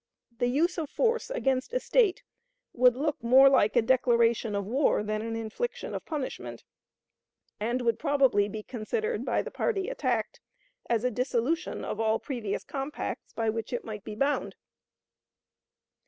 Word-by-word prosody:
The 245 - +2
use 330 +8 +1
of 310 -3 -3
force 465 0 0
against 270 - -1
a - - +3
State 450 -7 +2 0.5
would 250 0 +5
look 295 +1 -2
more 260 +3 +7
like 220 -6 +3
a 240 - +5
declaration 235 -3 +2
of 200 -1 -1
war 250 0 +2
than 215 0 -2
an 225 0 -4
infliction 225 - -4
of - - -6
punishment, 295 -5 -5 1.0
and 240 +4 -1
would 230 -1 +1
probably 270 -9 +3
be 215 +1 -6
considered 435 - -3
by - - 0
the - - -7
party 400 -3 -1
attacked - - -1 0.5
as 230 -1 +1
a 250 - +1
dissolution 255 +7 -1
of - - -4
all 220 0 +2
previous 235 -7 -4
compacts 275 +1 -5
by 225 -1 0
which 225 0 -5
it 245 - -3
might 210 -3 -6
be 210 - -7
bound." 275 +6 0
250 Hz, 155 wpm, -28 LUFS, 225-300 Hz, 1.0 s, more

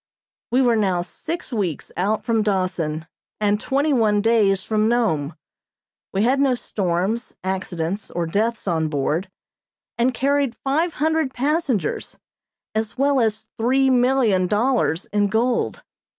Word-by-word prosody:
We 255 +3 +3
were 240 -2 +4
now 190 -5 +1
six 325 - -6
weeks 190 -9 -2
out 205 +4 0
from 230 -2 +2
Dawson 180 -6 -1 0.3
and 210 0 +1
twenty 280 +3 +1
one 215 -5 +3
days 205 -3 +3
from 215 0 +1
Nome; 170 -11 0 0.8
we 195 +2 +1
had 260 +4 +3
no 270 -2 +3
storms, 200 +2 -2
accidents 190 0 -3
or 170 0 -2
deaths 215 +6 -1
on 160 -3 +1
board, 155 +5 -1 0.7
and 245 +2 +3
carried 275 -1 +1
five 315 +5 0
hundred 315 -3 0
passengers, 280 - -1 0.6
as 220 +1 -2
well 275 0 +3
as 220 -1 -1
three 265 +3 +3
million 245 -7 +3
dollars 215 -4 +1
in 205 -1 +3
gold. 230 +4 0
220 Hz, 135 wpm, -22 LUFS, 190-255 Hz, 0.8 s, were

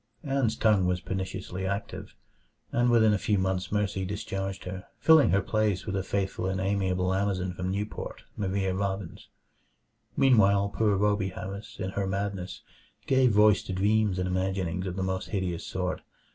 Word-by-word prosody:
Ann's 135 -6 0
tongue 105 -5 +3
was 90 0 +1
perniciously 95 0 -4
active, 100 +2 -4 0.6
and 120 0 +2
within 110 -3 +5
a 105 - +1
few 105 +2 +1
months 95 -1 -1
Mercy 100 -2 0
discharged 95 0 -4
her, 95 0 -6
filling 160 -3 +6
her 100 0 +2
place 105 -4 0
with 100 - -3
a 95 - 0
faithful 95 -1 -2
and 95 0 -1
amiable 95 -1 0
Amazon 95 -2 -1
from 90 0 -3
Newport, 100 +3 -4
Maria 95 -1 -1
Robbins. 95 -2 -4 0.9
Meanwhile 100 -6 +4
poor 105 -3 +2
Rhoby 100 -1 +1
Harris, 100 +3 -7
in 95 - -3
her 100 0 -2
madness, 95 -2 -3 0.4
gave 130 -1 +4
voice 105 0 +5
to 95 - -6
dreams 100 +1 +2
and 90 0 -1
imaginings 95 -1 -1
of 90 - -4
the 95 - -2
most 95 0 -2
hideous 90 -5 -2
sort. 90 -1 -2
95 Hz, 160 wpm, -28 LUFS, 95-105 Hz, 0.9 s, filling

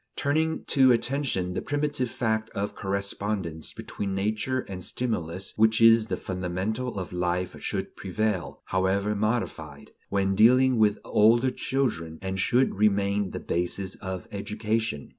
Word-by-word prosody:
Turning 160 +3 0
to 130 -3 +5
attention, 120 -7 0
the - - -2
primitive 145 -3 -1
fact 110 -2 -1
of 100 +1 -2
correspondence 100 -4 -3
between 100 -1 -5
nature 110 +6 -1
and 95 -5 -7
stimulus 95 -7 -2
which 110 +1 +4
is 115 -1 +6
the - - -2
fundamental 95 +6 -3
of 90 -2 -5
life 90 0 -1
should - - -3
prevail, 100 -1 -2
however 95 +3 +1
modified, 100 -9 -3 0.2
when 95 -1 +1
dealing 125 +5 +5
with 105 -1 +4
older 115 +4 +4
children, 110 -13 -2
and 95 0 -4
should 125 +7 +2
remain 100 -1 +2
the - - -5
basis 90 +2 -2
of 95 -2 -6
education. 105 -3 -2
105 Hz, 135 wpm, -27 LUFS, 95-115 Hz, 0.2 s, is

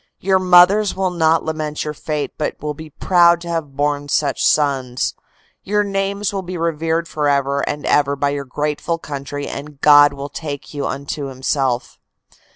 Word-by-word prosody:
Your 190 0 +2
mothers 185 +3 +5
will 190 -1 0
not 165 -2 +2
lament 155 -1 -3
your 150 - -4
fate 150 0 -4
but 150 - -3
will 150 0 -3
be 155 +1 -10
proud 170 +2 +4
to 170 - -7
have 160 -5 -3
borne 145 0 -1
such 140 -1 0
sons. 135 -4 +1 0.5
Your 210 +1 0
names 200 0 -2
will 195 - -2
be 180 -1 -6
revered 165 0 -1
forever 140 -2 0
and 145 0 -4
ever 140 -1 +2
by 140 0 0
your 140 -1 -4
grateful 150 +5 -2
country 145 -2 -6
and 145 0 -8
God 145 0 +7
will 140 0 -6
take 145 -1 -7
you 145 -2 -2
unto 140 +1 -4
Himself. 130 -1 -2
150 Hz, 165 wpm, -19 LUFS, 140-170 Hz, 0.5 s, God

